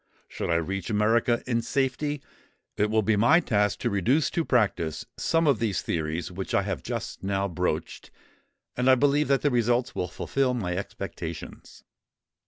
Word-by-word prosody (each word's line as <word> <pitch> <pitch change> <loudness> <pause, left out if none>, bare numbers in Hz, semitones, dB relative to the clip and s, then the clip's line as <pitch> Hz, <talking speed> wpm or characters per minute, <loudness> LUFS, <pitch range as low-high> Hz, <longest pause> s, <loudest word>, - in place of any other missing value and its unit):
Should - - -5
I 85 - +2
reach 90 +3 -2
America 115 +3 +2
in 115 -2 0
safety, 135 +4 -1 0.5
it 105 +1 +1
will 110 0 +2
be 110 +2 +2
my 120 +11 +5
task 105 - +1
to 120 - +1
reduce 120 - +2
to 170 - 0
practice 100 - 0
some 165 0 +1
of 140 -7 +3
these 110 -5 -1
theories 80 +1 -2
which 95 +2 -4
I - - +3
have - - -3
just - - -5
now 100 0 0
broached; 85 -3 -3 0.7
and 125 +1 +2
I 130 - +8
believe 145 +3 +2
that 140 -1 +2
the 145 - +3
results 120 0 +1
will 90 - -2
fulfil 135 +9 -1
all 125 - +1
my 90 -7 -2
expectations." 100 - -7
115 Hz, 175 wpm, -26 LUFS, 95-130 Hz, 0.7 s, I